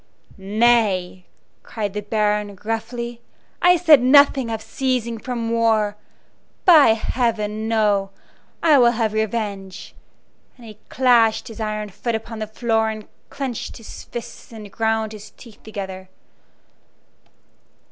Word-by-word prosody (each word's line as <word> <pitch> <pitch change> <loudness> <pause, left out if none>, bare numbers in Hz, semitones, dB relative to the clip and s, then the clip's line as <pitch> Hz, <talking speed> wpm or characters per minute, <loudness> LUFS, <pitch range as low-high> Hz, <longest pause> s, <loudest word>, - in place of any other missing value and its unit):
"Nay," 200 -3 +1 0.3
cried 205 -3 -5
the 210 - -3
Baron, 210 -1 -1
roughly, 235 +2 -4 0.4
"I 360 0 +5
said 320 -6 +6
nothing 270 -1 +5
of 225 -1 -3
ceasing 240 -1 -2
from 235 -1 -4
war. 220 -3 +1 0.7
By 305 -10 +7
heaven, 220 -2 -2
no! 210 -3 +1 0.5
I 305 -4 +5
will 240 -1 +5
have 220 -2 -1
revenge!" 205 -3 -4 0.6
And 240 - -14
he 215 -2 -12
clashed 240 -3 +3
his 225 - -11
iron 215 -1 -3
foot 215 +4 -3
upon 225 0 -6
the 215 - -4
floor 225 0 0
and 215 -1 -7 0.2
clinched 260 -5 -5
his 225 - -11
fists 240 0 -9
and 215 -3 -10
ground 220 0 -1
his 215 0 -11
teeth 230 -4 -15
together. 190 -3 -8
220 Hz, 125 wpm, -21 LUFS, 210-235 Hz, 0.7 s, By